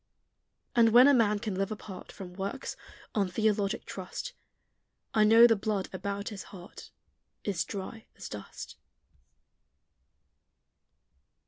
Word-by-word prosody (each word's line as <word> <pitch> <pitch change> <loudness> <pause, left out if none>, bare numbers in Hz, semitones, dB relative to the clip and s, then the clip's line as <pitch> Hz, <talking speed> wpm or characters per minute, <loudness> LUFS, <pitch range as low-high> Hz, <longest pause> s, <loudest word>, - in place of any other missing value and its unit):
And 230 -1 +6
when 245 +4 +8
a 285 - +7
man 215 -5 +3
can 205 0 -3
live 195 +3 -1
apart 200 -3 -8
From 180 -2 -9
works, 195 +8 -4 0.4
on 200 -3 +1
theologic 205 +1 0
trust, - - -6 0.8
I 215 - +4
know 225 +2 +8
the 230 -1 +6
blood 205 -1 -2
about 200 +2 -3
his 205 -4 -8
heart 185 0 -11 0.5
Is 195 -5 -1
dry 205 +3 -7
as - - -7
dust. 105 -1 -8
205 Hz, 120 wpm, -30 LUFS, 195-225 Hz, 0.8 s, when